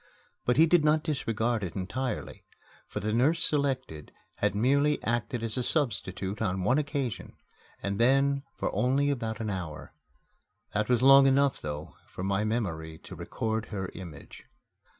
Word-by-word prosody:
But 125 Hz, -, +2 dB
he 160 Hz, -, +8 dB
did 165 Hz, -1 st, +4 dB
not 155 Hz, 0 st, +3 dB
disregard 115 Hz, -6 st, -1 dB
it 85 Hz, -4 st, -5 dB
entirely, 125 Hz, +7 st, -4 dB, 0.4 s
for -, -, -4 dB
the 105 Hz, +2 st, -2 dB
nurse 135 Hz, +8 st, +3 dB
selected 130 Hz, -, -1 dB, 0.3 s
had -, -, 0 dB
merely 140 Hz, +7 st, +3 dB
acted 120 Hz, +1 st, -1 dB
as 115 Hz, +2 st, -2 dB
a -, -, +1 dB
substitute 105 Hz, -, -2 dB
on 95 Hz, -3 st, 0 dB
one 125 Hz, +9 st, +3 dB
occasion, 140 Hz, -6 st, -3 dB, 0.5 s
and 100 Hz, +1 st, -2 dB
then 135 Hz, +3 st, +3 dB, 0.2 s
only 135 Hz, +3 st, +1 dB
for -, -, +3 dB
about 110 Hz, -4 st, -4 dB
an 110 Hz, -2 st, -2 dB
hour. 85 Hz, -5 st, -6 dB, 0.8 s
That 105 Hz, +2 st, 0 dB
was 125 Hz, 0 st, +3 dB
long 135 Hz, 0 st, +8 dB
enough, 140 Hz, 0 st, +3 dB
though, 75 Hz, +1 st, -6 dB
for 90 Hz, -, -7 dB
my 100 Hz, +1 st, +1 dB
memory 85 Hz, -8 st, -2 dB
to -, -, -11 dB
record 110 Hz, 0 st, -3 dB
her 95 Hz, -3 st, -4 dB
image. 85 Hz, -5 st, -10 dB
115 Hz, 155 wpm, -29 LUFS, 100-135 Hz, 0.8 s, he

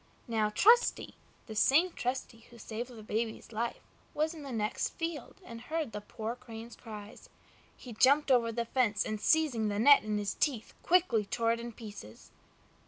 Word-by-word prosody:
Now 220 Hz, -2 st, +1 dB
Trusty 460 Hz, -, +4 dB, 0.3 s
(the 220 Hz, -, -8 dB
same 305 Hz, +11 st, +4 dB
Trusty 245 Hz, -4 st, -4 dB
who 240 Hz, -, -15 dB
saved 235 Hz, +2 st, -6 dB
the 230 Hz, -3 st, -11 dB
baby's 220 Hz, +2 st, -3 dB
life) 235 Hz, +2 st, -3 dB, 0.3 s
was 310 Hz, +2 st, 0 dB
in 320 Hz, -, -10 dB
the 275 Hz, -2 st, -7 dB
next 215 Hz, -1 st, -2 dB
field 330 Hz, -6 st, -4 dB
and 230 Hz, -1 st, -9 dB
heard 310 Hz, -1 st, -3 dB
the 210 Hz, -, -6 dB
poor 220 Hz, +2 st, -5 dB
Crane's 235 Hz, -2 st, -10 dB
cries. 210 Hz, -2 st, -11 dB, 0.5 s
He 245 Hz, -, -10 dB
jumped 275 Hz, +5 st, +4 dB
over 235 Hz, -2 st, +4 dB
the 235 Hz, +1 st, -2 dB
fence, 230 Hz, -4 st, +1 dB
and 215 Hz, -1 st, -4 dB
seizing 280 Hz, -9 st, +2 dB
the 205 Hz, -1 st, -2 dB
net 280 Hz, +6 st, +7 dB
in 215 Hz, -1 st, -1 dB
his 205 Hz, -1 st, -2 dB
teeth 255 Hz, -8 st, -1 dB
quickly 335 Hz, -, +3 dB
tore 230 Hz, +3 st, 0 dB
it 230 Hz, -, -1 dB
in 235 Hz, 0 st, -6 dB
pieces. 205 Hz, -, -11 dB
235 Hz, 175 wpm, -31 LUFS, 215-270 Hz, 0.5 s, net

